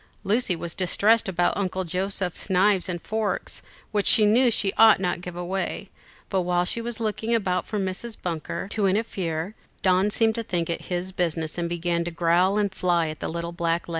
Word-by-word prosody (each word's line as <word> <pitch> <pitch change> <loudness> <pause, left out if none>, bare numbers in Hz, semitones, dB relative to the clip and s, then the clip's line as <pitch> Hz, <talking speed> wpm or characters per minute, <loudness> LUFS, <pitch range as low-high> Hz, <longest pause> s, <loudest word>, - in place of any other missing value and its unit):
Lucy 205 -1 +1
was 165 0 -5
distressed 205 +4 +2
about 175 -1 +1
Uncle 190 -1 -2
Joseph's 185 +1 -2
knives 190 0 +3
and 175 -1 -3
forks, 215 -3 -2 0.3
which 205 -2 +1
she 215 -3 +6
knew 240 +4 +5
she 200 -4 +1
ought 220 -2 +6
not 180 -2 0
to - - -7
give 180 0 -8
away; 180 +2 -3 0.4
but 190 -2 0
while 175 0 +1
she 230 - 0
was 235 0 -5
looking 225 +1 -1
about 185 -5 -1
for 215 - -3
Mrs. 195 +4 -4
Bunker 170 +1 -4
to 205 -2 0
interfere, 190 -4 -2 0.3
Don 190 +1 +3
seemed 220 +1 +3
to 230 - -3
think 170 -5 -2
it - - -4
his 180 +1 -3
business, 165 -3 -2
and 170 0 -1
began 170 0 -1
to - - -2
growl 175 +4 +2
and 205 -2 0
fly 175 -3 +1
at 155 - -7
the - - -3
little 170 +1 -4
black 170 -1 0
legs. - - -15
185 Hz, 200 wpm, -25 LUFS, 175-210 Hz, 0.4 s, she